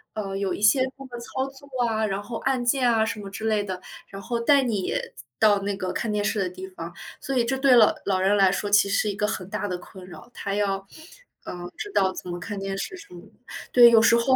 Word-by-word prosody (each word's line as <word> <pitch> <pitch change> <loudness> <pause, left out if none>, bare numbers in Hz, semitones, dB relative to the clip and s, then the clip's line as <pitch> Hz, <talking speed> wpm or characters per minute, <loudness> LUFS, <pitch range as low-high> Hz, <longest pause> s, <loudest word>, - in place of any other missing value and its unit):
呃， 195 -2 -4
有 195 -1 -1
一 - - -6
些 210 +6 +5 0.2
那 270 - -10
个 240 -2 -8
操 260 +3 -4
作 270 +1 -14 0.2
啊， 220 -1 0
然 195 -1 -2
后 230 +3 -7
按 265 -2 0
键 250 -1 +3
啊 220 -1 +2
什 220 -1 -4
么 195 - -8
之 220 +3 -6
类 215 -2 +1
的， 185 -2 -5 0.3
然 195 - -8
后 235 +3 -2
带 275 +4 +4
你 210 -7 -1 0.5
到 205 -2 +5
那 200 0 -3
个 185 -2 -3
看 225 - -2
电 210 0 0
视 215 - 0
的 190 -2 0
地 185 +1 -9
方， 170 -2 -8 0.3
所 270 - -4
以 235 - +3
这 265 +2 -1
对 265 -2 +5
老 220 - +6
老 190 -2 +1
人 195 +2 +3
来 195 -2 +5
说 205 +1 -2
其 205 0 +4
实 200 - +1
是 210 - +1
一 200 - -3
个 210 - 0
很 185 -3 -4
大 210 0 -3
的 180 -3 -3
困 185 +1 -13
扰。 215 +6 -12
他 200 - -4
要， 195 -1 -1 0.6
呃， 175 0 -7
知 415 - -5
道 190 -1 +3
怎 180 - -8
么 175 - -4
看 205 +3 -6
电 195 0 -4
视 370 - -5
什 330 - -14
么 175 - -10 0.5
对， 240 -1 +8
有 225 -1 +6
时 235 +1 +5
候 260 +3 +3
205 Hz, 280 characters per minute, -25 LUFS, 195-235 Hz, 0.6 s, 对